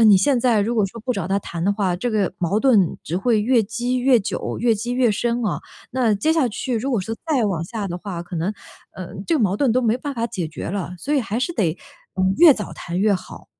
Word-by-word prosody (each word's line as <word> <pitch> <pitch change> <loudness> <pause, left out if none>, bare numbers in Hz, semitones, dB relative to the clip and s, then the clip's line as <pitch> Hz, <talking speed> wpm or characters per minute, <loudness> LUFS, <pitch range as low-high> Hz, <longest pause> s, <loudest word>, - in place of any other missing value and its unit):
你 205 -2 +8
现 245 +7 +3
在 235 -3 +3
如 230 +4 0
果 210 -3 +2
说 230 +4 -10
不 250 +3 -1
找 195 -6 -3
他 195 +1 +1
谈 170 -1 -5
的 200 - +3
话， 190 -4 0
这 240 +6 -2
个 205 -5 0
矛 190 +5 0
盾 220 -10 +3
只 170 - -3
会 220 +2 +2
越 235 +1 +3
积 240 +4 -2
越 250 -2 +4
久、 - - -3
越 235 -2 +3
积 240 +4 -3
越 250 -3 +3
深 235 +3 -1
啊， 200 - -1 0.3
那 240 -4 +2
接 310 +11 +1
下 315 -6 +2
去 240 +3 -3
如 265 +5 -2
果 235 - +1
说 225 +4 -4 0.2
再 255 -7 +3
往 170 -5 -1
下 205 0 -4
的 175 - -4
话， 180 -3 -5
可 175 -1 -7
能， 175 +6 -1 0.4
呃， 185 -2 -7 0.2
这 335 - +2
个 - - 0
矛 200 -2 +2
盾 260 -3 +2
都 255 - +3
没 230 +1 +2
办 285 +2 -5
法 230 0 -1
解 190 -8 -4
决 155 - -7
了， 185 -1 -4
所 285 - -3
以 275 - +3
还 225 0 -3
是 345 - -1
得， 175 - 0 0.4
嗯， 185 +1 +2
越 335 -4 +9
早 210 - -6
谈 175 +1 -4
越 205 0 +3
好。 185 - -8
215 Hz, 280 characters per minute, -22 LUFS, 190-245 Hz, 0.4 s, 越